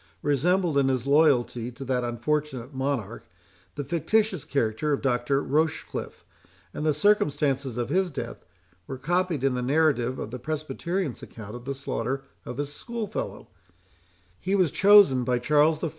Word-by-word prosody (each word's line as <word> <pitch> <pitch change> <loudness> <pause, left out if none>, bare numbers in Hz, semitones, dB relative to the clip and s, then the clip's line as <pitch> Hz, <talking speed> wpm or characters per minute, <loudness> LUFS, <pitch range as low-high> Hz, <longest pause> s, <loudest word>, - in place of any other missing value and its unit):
resembled, 165 +2 +2
in 135 - +2
his 130 -2 0
loyalty 140 -5 +3
to 130 +3 -9
that 125 -1 0
unfortunate 135 +1 -2
monarch, 135 -5 -3 0.5
the 145 - -3
fictitious 180 - 0
character 140 +2 -1
of 140 - -1
Dr. 135 +1 +1
Rochecliffe; 155 +3 -2 0.5
and - - -4
the 155 - +3
circumstances 145 - +1
of 120 0 -2
his 185 +4 +1
death 125 -6 -6 0.4
were 135 - -5
copied 170 +1 0
in 135 -1 +2
the 125 - -2
narrative 130 -2 +2
of 110 - -5
the 125 - -5
Presbyterian's 155 +3 -3
account 105 -2 -10
of 120 0 -9
the 140 0 -3
slaughter 135 0 -3 0.2
of 125 - -6
his 145 0 -3
school 235 +5 -5
fellow;—he 90 - -7
was 185 -6 +3
chosen 195 -11 +6
by 125 0 +1
Charles 150 +5 +3
I. 165 - 0
140 Hz, 155 wpm, -26 LUFS, 125-160 Hz, 0.5 s, chosen